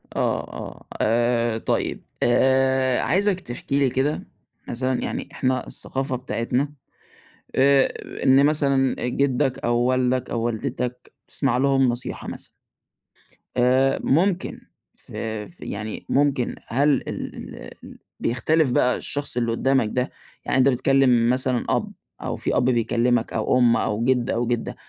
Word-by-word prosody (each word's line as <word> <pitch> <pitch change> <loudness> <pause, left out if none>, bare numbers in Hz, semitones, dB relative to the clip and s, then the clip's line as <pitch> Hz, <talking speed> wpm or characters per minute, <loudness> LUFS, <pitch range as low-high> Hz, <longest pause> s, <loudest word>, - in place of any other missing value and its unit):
آه، - - 0
آه، - - -9 0.2
آآ، 120 0 +2
طيب - - -2 0.2
آآ، 130 +1 +3
عايزك 195 0 +1
تحكِي 140 -2 -3
لي 135 -2 +3
كده 135 +4 -1 0.4
مثلًا 130 +1 -1
يعني - - -4
إحنا 130 -1 -1
الثقافة 135 0 -3
بتاعتنا 130 +3 -2 0.8
آآ، 135 0 +5 0.4
إن 135 +2 +5
مثلًا 140 -3 +2
جدك 135 0 0
أو 120 0 +2
والدك 125 +1 +1
أو 115 - -2
والدتك 125 +1 -3 0.2
تسمَع - - 0
لهم 135 -1 +3
نصيحة 120 +1 -4
مثلًا. - - -7 1.1
آآ، 130 +2 +3
ممكن 180 +5 +1 0.3
في 110 -2 -6
ف 175 - -18
يعني 105 +1 -6
ممكن. 140 -3 +1
هل 140 +5 +2 0.2
ال - - -5 0.5
ال - - -13 0.2
بيختلف 140 +4 +1
بقى 125 0 +2
الشخص 145 -3 0
اللي 115 -1 +1
قدامك 130 -1 +1
ده 125 +1 -1 0.3
يعني - - +1
أنت 130 +1 +5
بتكلم 125 -2 +3
مثلًا 125 -1 +1
أب - - 0 0.3
أو - - -2
في - - -1
أب - - +2
بيكلمك 120 -1 +1
أو 125 - +1
أم 120 -2 +4
أو 105 +2 -1
جد 125 -1 +1
أو 120 +1 0
جدة، 120 -1 -2
130 Hz, 135 wpm, -23 LUFS, 120-135 Hz, 1.1 s, آآ